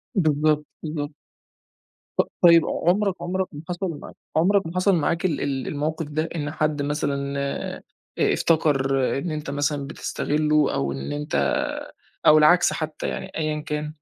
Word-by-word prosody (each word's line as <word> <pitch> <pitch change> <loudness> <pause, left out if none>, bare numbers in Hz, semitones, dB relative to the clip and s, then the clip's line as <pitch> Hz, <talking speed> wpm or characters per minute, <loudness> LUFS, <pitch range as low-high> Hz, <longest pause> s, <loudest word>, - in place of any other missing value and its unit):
بالضبط، 150 -3 +2 0.2
بالضبط. 150 -1 -3 1.1
ط - - +7 0.2
طيب 170 -2 +8
عُمرك 195 +2 +1
عُمرك 185 +2 -1
ما 145 - -8
حصل 175 -2 -2
معاك - - -11 0.2
عُمرك 190 +3 +3
ما 170 - -7
حصل 185 +1 +3
معاك 170 +3 0
ال 165 -5 0
ال 135 -3 -2
الموقف 155 +2 -2
ده؟ 155 +2 -2
إن 145 -2 -2
حد 155 -2 0
مثلًا 140 -1 -1
آآ 140 0 -3 0.4
افتكر 135 -5 +2
إن 165 +3 -3
أنت 150 -2 -4
مثلًا 145 0 -1
بتستغلّه 150 0 0
أو 70 0 -1
إن 70 0 -5
أنت 150 +1 -3 0.9
أو 155 - +8
العكس 155 +4 +5
حتّى 155 -1 -4
يعني - - -5
أيًا 155 -1 -1
كان؟ 150 0 -3
150 Hz, 150 wpm, -24 LUFS, 145-165 Hz, 1.1 s, طيب